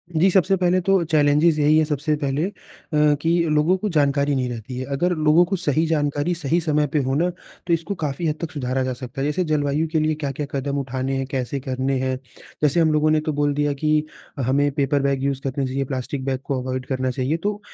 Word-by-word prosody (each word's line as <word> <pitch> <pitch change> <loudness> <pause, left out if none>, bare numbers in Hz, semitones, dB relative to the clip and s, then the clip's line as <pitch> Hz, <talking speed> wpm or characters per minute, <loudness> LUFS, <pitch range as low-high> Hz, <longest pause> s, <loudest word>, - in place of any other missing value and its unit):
जी 175 +5 +4
सबसे 190 +1 +3
पहले 180 0 +2
तो 195 0 +2
चैलेंजेज़ 150 +1 +4
यही 150 +1 +4
है 160 - +4
सबसे 150 0 -1
पहले 140 +3 0
अ, - - -7 0.7
कि 165 - 0 0.2
लोगों 150 +4 +3
को 210 +2 -2
जानकारी 145 -3 +2
नहीं 125 -2 -1
रहती 120 +1 -6
है। 130 - -4
अगर 175 +6 +1
लोगों 155 +2 +4
को 195 +3 -1
सही 160 -3 +1
जानकारी 145 +1 0
सही 165 +1 0
समय 150 -2 +1
पे 150 - +3
हो 130 +1 -1
ना 170 +5 +2 0.4
तो 170 - +2
इसको 165 +4 -1
काफ़ी 155 0 -2
हद 150 - 0
तक 170 - -4
सुधारा 130 -2 -2
जा 130 0 -2
सकता 130 +2 -7
है। - - 0
जैसे 180 +5 0
जलवायु 150 +1 +1
के 160 - +2
लिए 155 0 +1
क्या-क्या 145 -1 -3
कदम 140 +1 -2
उठाने 135 0 -2
हैं? 135 - -2
कैसे 130 +1 -2
करने 130 0 -1
हैं? 130 0 -1 0.5
जैसे 150 +3 +3
हम 160 -2 +4
लोगों 155 0 +3
ने 155 - +3
तो 155 - -1
बोल 145 0 +1
दिया 145 0 0
कि 150 +2 +1 0.4
हमें 140 +3 +2
पेपर 140 0 +1
बैग 135 -1 0
यूज़ 135 -1 -1
करना 135 0 -2
चाहिए 135 +1 -2
प्लास्टिक 130 +1 -4
बैग 135 -1 -1
को 135 -3 -1
अवॉइड 130 0 -4
करना 130 -1 -1
चाहिए 135 +5 -1
तो 205 0 -1
145 Hz, 230 wpm, -22 LUFS, 135-155 Hz, 0.7 s, जी